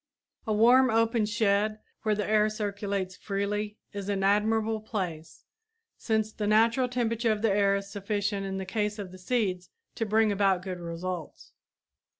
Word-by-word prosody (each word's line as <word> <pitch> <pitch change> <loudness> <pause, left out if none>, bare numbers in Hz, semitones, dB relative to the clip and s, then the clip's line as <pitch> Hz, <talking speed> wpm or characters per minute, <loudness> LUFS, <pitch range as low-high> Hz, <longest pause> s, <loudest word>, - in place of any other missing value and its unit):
A - - 0
warm, 245 +5 +6
open 225 -1 +2
shed 215 -1 +1 0.2
where 215 -1 +1
the 210 -2 -2
air 215 0 +3
circulates 200 -3 -3
freely 205 +2 -3 0.2
is 200 0 -5
an 195 -1 0
admirable 220 +2 +2
place, 180 -7 -5 0.5
since 220 -1 -1
the 210 - -3
natural 230 +4 +3
temperature 230 -2 0
of 215 0 -2
the 225 - +3
air 200 0 +3
is 200 0 -5
sufficient 200 0 -2
in 195 0 -3
the 190 - -4
case 210 +2 -2
of 190 -3 -7
seeds 185 -3 -1 0.2
to 225 - -3
bring 215 0 +3
about 195 -2 +2
good 185 -2 -5
results. 170 0 -6
210 Hz, 155 wpm, -28 LUFS, 195-220 Hz, 0.5 s, warm